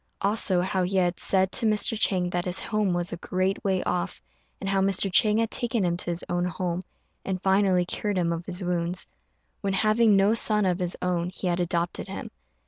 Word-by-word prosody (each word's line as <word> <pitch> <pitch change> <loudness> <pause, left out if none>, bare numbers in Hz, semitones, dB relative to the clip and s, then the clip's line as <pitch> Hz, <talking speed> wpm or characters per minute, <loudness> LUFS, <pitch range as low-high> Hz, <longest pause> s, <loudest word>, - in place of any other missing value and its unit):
Also 195 -3 +1
how 190 +1 0
he 185 +2 0
had 180 -1 +1
said 190 -1 +3
to 230 - +2
Mr. 215 +1 +2
Chang 185 -4 +1
that 175 0 -1
his 180 0 -1
home 215 -3 0
was 175 0 -2
a - - -4
great 185 +2 -1
way 190 -2 0
off, 180 +1 -2 0.4
and 195 - -5
how 195 0 +1
Mr. 195 0 +1
Chang 210 +2 +5
had 225 -1 0
taken 235 -5 0
him 170 -1 +1
to 175 - -3
his 170 0 -2
own 175 0 0
home, 180 0 -2 0.4
and 190 -1 -3
finally 190 -1 +2
cured 205 +2 -2
him 170 -2 +1
of 170 +1 -6
his 185 +1 -3
wounds; 175 0 -1 0.6
when, 195 -1 -1
having 215 +2 +4
no 195 +2 +4
son 210 -2 +1
of 180 0 0
his 180 -1 -2
own, 175 -1 0
he 185 - -6
had 175 0 0
adopted 170 0 -2
him. - - -7
185 Hz, 215 wpm, -26 LUFS, 175-200 Hz, 0.6 s, Chang